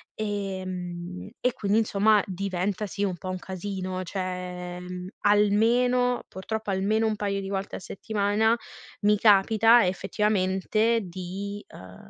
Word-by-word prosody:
Ehm, 185 Hz, -4 st, -4 dB
e 250 Hz, -, +2 dB
quindi 215 Hz, -3 st, +1 dB
insomma 210 Hz, -1 st, +3 dB
diventa 195 Hz, +2 st, -2 dB
sì 200 Hz, +2 st, -3 dB
un 185 Hz, -3 st, -1 dB
po' 185 Hz, -, -6 dB
un 185 Hz, -, -3 dB
casino, 185 Hz, 0 st, -4 dB
cioè, 180 Hz, -1 st, -4 dB
mhmm, 180 Hz, 0 st, -7 dB, 0.2 s
almeno 235 Hz, +5 st, +3 dB
purtroppo 220 Hz, +3 st, -5 dB
almeno 205 Hz, +4 st, +1 dB
un 215 Hz, -1 st, 0 dB
paio 200 Hz, -1 st, -1 dB
di 195 Hz, -, -5 dB
volte 195 Hz, 0 st, -3 dB
a -, -, -5 dB
settimana 210 Hz, +3 st, +1 dB, 0.5 s
mi 210 Hz, 0 st, +4 dB
capita 220 Hz, +2 st, +6 dB
effettivamente 205 Hz, +3 st, +1 dB
di, 190 Hz, +3 st, -6 dB
uhm, 95 Hz, 0 st, -13 dB
200 Hz, 130 wpm, -26 LUFS, 185-215 Hz, 0.5 s, capita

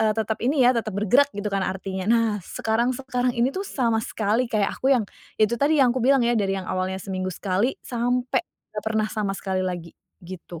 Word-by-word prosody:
eee, 220 Hz, -1 st, +3 dB
tetep 220 Hz, -1 st, -1 dB
ini 275 Hz, +5 st, +1 dB
ya, 250 Hz, -, +6 dB
tetap 220 Hz, -3 st, -2 dB
bergerak 245 Hz, +8 st, +4 dB
gitu 205 Hz, +1 st, -2 dB
kan, 195 Hz, -, +1 dB
artinya. 190 Hz, 0 st, -4 dB
Nah, 230 Hz, -1 st, +4 dB, 0.2 s
sekarang-sekarang 250 Hz, +4 st, -1 dB
ini 240 Hz, +2 st, +3 dB
tuh 385 Hz, +5 st, -3 dB
sama 235 Hz, -, 0 dB
sekali 220 Hz, +3 st, 0 dB
kayak 210 Hz, -3 st, +1 dB
aku 270 Hz, +1 st, +2 dB
yang 240 Hz, -5 st, +2 dB, 0.4 s
ya -, -, +8 dB
itu 235 Hz, -, -1 dB
tadi 300 Hz, +3 st, +3 dB
yang 260 Hz, -, +6 dB
aku 260 Hz, -, -2 dB
bilang 270 Hz, +1 st, +5 dB
ya, 240 Hz, -, +2 dB
dari 200 Hz, -3 st, +1 dB
yang 190 Hz, -1 st, -6 dB
awalnya 185 Hz, 0 st, -1 dB
seminggu 185 Hz, -1 st, -3 dB
sekali, 200 Hz, +7 st, 0 dB
sampe 245 Hz, +3 st, 0 dB, 0.3 s
nggak 210 Hz, -, -5 dB
pernah 220 Hz, -1 st, +1 dB
sama 210 Hz, -3 st, -2 dB
sekali 190 Hz, -1 st, -2 dB
lagi, 175 Hz, -2 st, -4 dB, 0.3 s
gitu. 175 Hz, -2 st, -9 dB
220 Hz, 210 wpm, -24 LUFS, 195-245 Hz, 0.4 s, ya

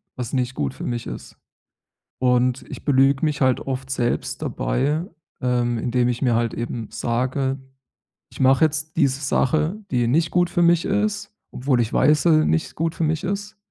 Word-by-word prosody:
was 125 Hz, -3 st, -5 dB
nicht 130 Hz, -1 st, -1 dB
gut 70 Hz, -2 st, -2 dB
für -, -, -7 dB
mich 120 Hz, -1 st, -3 dB
ist. -, -, -8 dB, 0.9 s
Und 125 Hz, 0 st, +2 dB
ich -, -, -8 dB
belüge 135 Hz, +1 st, +3 dB
mich 150 Hz, -2 st, -1 dB
halt 130 Hz, -2 st, +3 dB
oft 130 Hz, 0 st, -5 dB
selbst 120 Hz, -2 st, -1 dB
dabei, 140 Hz, -, -1 dB, 0.4 s
ähm, 120 Hz, -2 st, 0 dB
indem 125 Hz, 0 st, 0 dB
ich 120 Hz, -1 st, -2 dB
mir 120 Hz, -3 st, +3 dB
halt 115 Hz, 0 st, 0 dB
eben 120 Hz, -1 st, -4 dB
sage: 130 Hz, +3 st, -1 dB, 0.7 s
„Ich -, -, -12 dB
mache 135 Hz, +3 st, +5 dB
jetzt 155 Hz, +1 st, -2 dB
diese 140 Hz, -3 st, +2 dB
Sache, 155 Hz, +7 st, +1 dB
die 120 Hz, -1 st, +2 dB
nicht 160 Hz, +6 st, +1 dB
gut 175 Hz, -1 st, +2 dB
für 175 Hz, -, +1 dB
mich 170 Hz, 0 st, +4 dB
ist, 205 Hz, 0 st, -1 dB, 0.2 s
obwohl 125 Hz, -1 st, 0 dB
ich 115 Hz, -, -1 dB
weiß 150 Hz, +3 st, +3 dB
dass 170 Hz, -, +5 dB
sie -, -, +1 dB
nicht 165 Hz, -, 0 dB
gut 165 Hz, +1 st, -2 dB
für 165 Hz, -, 0 dB
mich 155 Hz, 0 st, 0 dB
ist.“ 205 Hz, +2 st, -4 dB
135 Hz, 185 wpm, -22 LUFS, 125-160 Hz, 0.9 s, mache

